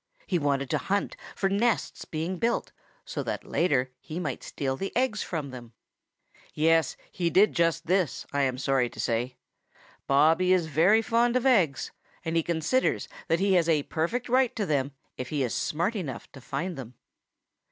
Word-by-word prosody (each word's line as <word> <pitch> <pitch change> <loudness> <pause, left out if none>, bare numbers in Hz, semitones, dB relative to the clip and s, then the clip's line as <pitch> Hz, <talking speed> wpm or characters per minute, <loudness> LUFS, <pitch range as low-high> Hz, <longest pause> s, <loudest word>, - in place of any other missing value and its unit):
He 180 - 0
wanted 140 -2 0
to - - +1
hunt 200 +1 -1 0.2
for 195 - +1
nests 205 +3 0
being 165 +4 -3
built, 235 +5 0 0.3
so - - -4
that - - -3
later 135 -7 +1
he 160 +3 -6
might 180 - -3
steal 135 -2 -3
the 195 +8 -4
eggs 245 -4 +1
from 150 -6 -4
them. 120 -2 -10 0.8
Yes, 165 -1 +3
he 175 -2 0
did 195 +4 +4
just 165 0 +1
this, 180 -5 0
I 145 - +1
am 130 -2 +1
sorry 130 -2 +1
to - - -13
say. 120 +2 -1 0.7
Bobby 160 +6 +4
is 180 -3 +2
very 170 +9 +4
fond 235 +2 +2
of 255 0 +1
eggs, 185 - +3 0.3
and 165 0 -1
he 165 - +4
considers 170 +10 0 0.2
that 165 - +2
he 195 0 +3
has 170 -2 +3
a 150 -3 +3
perfect 170 - -2
right 255 0 +2
to 210 - -1
them 140 -4 0 0.3
if 125 - -4
he 145 -3 0
is 120 - -1
smart 170 +9 -1
enough 150 - -5
to 135 - -12
find 170 +7 -4
them. 125 -2 -8
165 Hz, 180 wpm, -27 LUFS, 140-195 Hz, 0.8 s, did